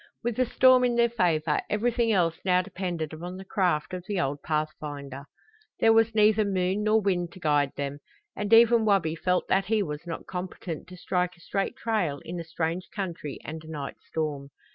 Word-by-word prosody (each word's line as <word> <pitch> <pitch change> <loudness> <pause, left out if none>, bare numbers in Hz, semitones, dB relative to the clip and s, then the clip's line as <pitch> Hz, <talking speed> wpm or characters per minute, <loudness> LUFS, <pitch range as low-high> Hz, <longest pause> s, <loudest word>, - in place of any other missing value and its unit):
With 235 -1 -2
the 255 -1 +2
storm 255 +1 +5
in 245 -1 +2
their 235 0 +3
favor 165 -8 +1
everything 230 +2 +1
else 170 -5 +2
now 180 -1 +3
depended 175 -5 -4
upon 175 +3 -7
the 190 - -9
craft 180 -5 0
of 180 -1 -4
the 205 -3 -1
old 145 -3 -1
pathfinder. 145 -3 -4 0.5
There 225 - +5
was 225 0 +3
neither 215 0 +5
moon 190 0 0
nor 215 +1 +4
wind 180 -4 0
to - - -12
guide 145 -4 +2
them, 140 0 -4 0.4
and 205 -1 -3
even 230 0 +7
Wabi 195 -7 +2
felt 180 +2 0
that 190 0 +2
he 215 +1 +1
was 150 0 -6
not 165 - -5
competent 180 -3 -6
to 185 - -11
strike 180 0 -1
a - - -21
straight 195 +2 -2
trail 195 -11 -1
in 175 +1 -5
a - - -4
strange 165 +2 -3
country 170 -8 -5
and 160 +1 -6
a 160 - -12
night 145 -3 -6
storm. 145 -3 -3
180 Hz, 195 wpm, -27 LUFS, 155-210 Hz, 0.5 s, even